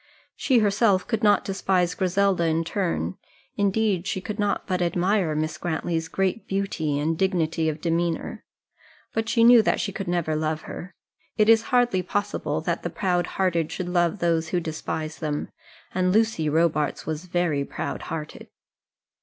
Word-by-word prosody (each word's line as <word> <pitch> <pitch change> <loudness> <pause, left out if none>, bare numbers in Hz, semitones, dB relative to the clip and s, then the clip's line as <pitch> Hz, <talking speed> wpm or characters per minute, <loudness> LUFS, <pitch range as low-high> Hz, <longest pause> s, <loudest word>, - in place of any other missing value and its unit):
She 260 - +2
herself 205 -2 +3
could 225 -3 -1
not 210 -2 +4
despise 185 -2 +1
Griselda 190 -1 +1
in 160 +1 +1
turn; 165 - -2 0.4
indeed 200 -2 +1
she 190 - -1
could 210 +3 -6
not 205 -1 0
but 185 -1 -1
admire 175 -1 +1
Miss 155 +2 -2
Grantly's 165 -1 -2
great 190 +5 -1
beauty 195 -7 -1
and 155 +3 0
dignity 165 -3 +1
of 155 0 -5
demeanour; 170 0 -1 0.7
but 225 +1 -1
she 230 -1 +3
knew 240 0 +8
that 215 - +1
she 200 - -2
could 195 -1 -5
never 170 -3 0
love 155 0 -1
her. 185 - -9 0.4
It 215 0 +4
is 225 0 +6
hardly 245 -7 +3
possible 205 +1 -2
that - - -2
the - - -3
proud 180 -3 0
hearted 170 -4 +1
should 180 -2 -4
love 175 +1 +1
those 165 -3 +1
who 175 +2 0
despise 160 -1 -4
them; 150 -2 -3 0.4
and 185 0 +1
Lucy 215 -7 +2
Robarts 155 -1 +1
was 155 +2 -4
very 175 -5 0
proud 140 - -5
hearted. 155 -1 -6
180 Hz, 160 wpm, -25 LUFS, 160-200 Hz, 0.7 s, knew